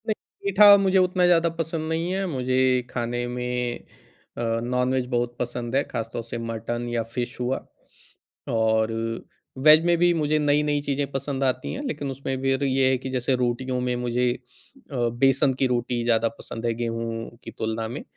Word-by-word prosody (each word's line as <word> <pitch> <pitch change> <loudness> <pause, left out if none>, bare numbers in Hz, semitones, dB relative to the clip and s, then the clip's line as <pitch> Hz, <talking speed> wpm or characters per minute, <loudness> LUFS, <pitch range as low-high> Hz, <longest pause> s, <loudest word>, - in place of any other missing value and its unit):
नहीं। 215 - +2 0.3
मीठा 200 +1 +8
मुझे 195 -1 +2
उतना 180 -1 +3
ज़्यादा 170 -1 +4
पसंद 160 -1 -3
नहीं 165 +2 -1
है। 195 0 -1
मुझे 130 -5 -1 0.3
खाने 120 0 -2
में 125 0 -2 0.6
अ, - - -3 0.2
नॉनवेज 125 +1 0
बहुत 120 0 0
पसंद 120 0 -3
है, 140 - +4
खास 115 -4 -5
तौर 115 - -3
से 115 +1 -6
मटन 115 +1 -4
या 120 -1 0
फिश 120 +3 -5
हुआ। 125 +2 0 0.9
और 110 -1 +2
अ, 115 +3 -6
वेज 155 +2 +7
में 175 0 +3
भी 175 +1 +4
मुझे 155 -2 +1
नई-नई 145 0 +2
चीज़ें 145 0 -1
पसंद 135 0 -3
आती 130 -1 -1
हैं, 270 - -4
लेकिन 145 - -3
उसमें 135 0 -3
फिर 135 +1 +1
ये 135 -1 +3
है 130 - +2
कि 130 +1 -6
जैसे 130 0 0
रोटियों 125 +1 -1
में 125 0 0
मुझे 125 +1 +1 0.6
अ, - - -6 0.3
बेसन 135 +1 +4
की 135 - +4
रोटी 120 -1 -1
ज़्यादा 115 -1 +2
पसंद 115 +1 -7
है, 115 - +1
गेहूँ 115 0 -4
की - - -8
तुलना 110 0 -3
में। 120 +5 -6
125 Hz, 180 wpm, -24 LUFS, 120-145 Hz, 0.9 s, मीठा